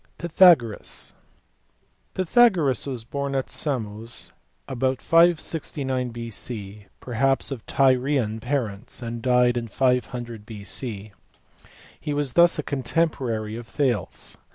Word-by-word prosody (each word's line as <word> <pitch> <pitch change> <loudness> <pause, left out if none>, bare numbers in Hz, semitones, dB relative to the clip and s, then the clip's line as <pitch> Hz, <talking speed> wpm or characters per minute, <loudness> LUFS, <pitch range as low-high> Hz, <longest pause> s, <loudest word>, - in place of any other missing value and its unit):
Pythagoras*. 165 - +3 1.0
Pythagoras 185 - +3
was 125 -4 -5
born 140 +3 -3
at 135 - -2
Samos 115 -6 -3 0.4
about 130 0 -1
569 155 -6 +1
B.C., 110 -3 -6
perhaps 135 +3 0
of 125 -5 -5
Tyrian 130 -4 +2
parents, 120 -2 -3
and 115 0 -5
died 125 0 +3
in 115 -1 -3
500 120 -2 -1
B.C. 105 0 -5 0.9
He 150 - -3
was 145 -3 -1
thus 170 0 +5
a 150 - -2
contemporary 130 -7 -1
of 120 0 -8
Thales. 120 - -2
125 Hz, 105 wpm, -24 LUFS, 115-140 Hz, 1.0 s, thus